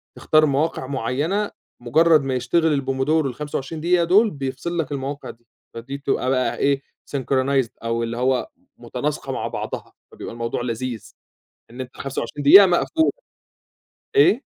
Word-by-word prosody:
تختار 155 0 +3
مواقع 145 -1 0
معيّنة، 145 - -1 0.3
مجرّد 155 +5 +4
ما 135 -1 -2
يشتغل 145 +4 +1
الpomodoro 135 +4 0
ال25 145 +3 -4
دقيقة 175 +1 +3
دول، 200 +6 +4
بيفصل 140 +5 -4
لك 155 -4 -2
المواقع 140 +1 -4
دي، 120 0 -13 0.3
فدي 120 +4 -6
بتبقى 135 -2 -1
بقى 130 -1 0
إيه، 140 -1 +1 0.4
synchronized 135 -1 +1
أو 115 0 -1
اللي 115 0 -4
هو 130 0 0 0.3
متناسقة - - -4
مع - - -3
بعضها، - - -6 0.2
فبيبقى - - -8
الموضوع 115 0 -3
لذيذ، 120 -1 -4 0.6
إن 125 +2 -7
أنت 130 0 -9
25 140 +1 -4
دقيقة 195 +8 +10
مقفول. 295 - +2 1.0
إيه؟ 275 - +5
140 Hz, 140 wpm, -22 LUFS, 130-160 Hz, 1.0 s, دقيقة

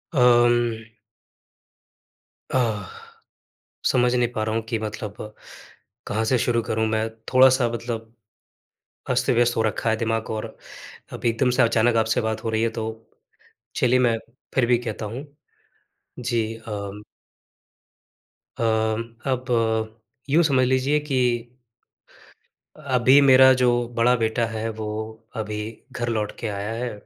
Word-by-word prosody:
अम। 120 -2 +3 1.7
अह, 110 -6 0 1.0
समझ 125 0 +2
नहीं 120 -1 +2
पा 110 - -1
रहा 110 +1 -2
हूँ 115 - 0
कि 115 - 0
मतलब 105 -1 -5 0.9
कहाँ 110 +2 -1
से 125 +3 +2
शुरू 115 0 +1
करूँ 110 0 -1
मैं? 110 0 0 0.2
थोड़ा-सा 130 -1 +5
मतलब 115 -1 -5 1.0
अस्त-व्यस्त 120 -1 +2
हो 110 - +3
रखा 110 +1 -1
है - - +2
दिमाग 115 0 -2
और 110 -1 -3 0.7
अब - - -7
एकदम 120 +2 +2
से - - +5
अचानक 115 0 +2
आपसे 110 0 +1
बात 110 0 -3
हो - - 0
रही 110 0 0
है, 115 - +2
तो 110 0 -6 0.7
चलिए, 125 0 +3
मैं 120 -2 +3 0.4
फिर 130 -3 +3
भी 120 0 +3
कहता 110 -2 -5
हूँ। 120 +7 -6 0.9
जी, 115 -2 -1
अम 105 -2 -7 1.6
अम, 110 0 +1 0.3
अब 130 0 -2 0.8
यूँ 160 +5 +4
समझ 135 -5 +3
लीजिए 130 +3 +2
कि 135 - 0 1.6
अभी 130 -2 +4
मेरा 130 -1 +7
जो 120 -1 +2
बड़ा 120 +2 +4
बेटा 115 0 0
है, 110 0 -4
वो 110 0 -6
अभी 105 0 -5
घर 120 -1 -3
लौट 110 -2 -1
के 115 - -3
आया 100 +1 -4
है 125 - -2
115 Hz, 130 wpm, -23 LUFS, 110-125 Hz, 1.7 s, मेरा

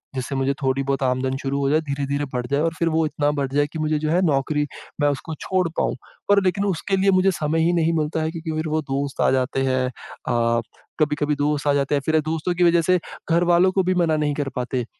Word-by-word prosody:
जिससे 130 +1 -3
मुझे 135 +1 +1
थोड़ी 135 0 +1
बहुत 135 0 -1
आमदन 130 +1 0
शुरू 140 0 -2
हो 140 -1 +1
जाए 155 +2 +3
धीरे-धीरे 140 0 -2
बढ़ 125 -1 -2
जाए 140 +2 0
और 165 0 0
फिर 170 - +2
वो 160 0 +1
इतना 145 -1 0
बढ़ 140 - 0
जाए 145 +1 +2
कि 160 - -4
मुझे 155 0 0
जो 155 - -2
है 180 - +3
नौकरी 150 0 +1 0.4
मैं 145 - +4
उसको 145 +3 -4
छोड़ 185 -2 0
पाऊँ। - - 0 0.3
पर 200 0 +5
लेकिन 195 +2 +1
उसके 195 +1 -1
लिए 195 +1 +3
मुझे 185 +1 +4
समय 155 -1 -1
ही 170 - +3
नहीं 165 -1 +2
मिलता 155 +1 -1
है 160 - -1
क्योंकि 165 -1 -5
फिर 155 0 -2
वो 155 +1 0
दोस्त 140 0 -3
आ - - +4
जाते 130 +1 0
हैं 130 -1 +1
अ, 115 -1 -2 0.4
कभी-कभी 150 0 +1
दोस्त 145 0 -1
आ 145 - +4
जाते 140 +1 +1
हैं 140 - 0
फिर 160 0 +3
दोस्तों 160 +3 -2
की 180 - +2
वजह 170 0 +4
से 180 +2 +2 0.3
घर 170 +1 +4
वालों 175 +2 +5
को 190 0 +1
भी 185 +1 +1
मना 160 -2 +1
नहीं 150 -1 0
कर 140 -2 -2
पाते। 125 0 -2
150 Hz, 250 wpm, -22 LUFS, 135-165 Hz, 0.4 s, पर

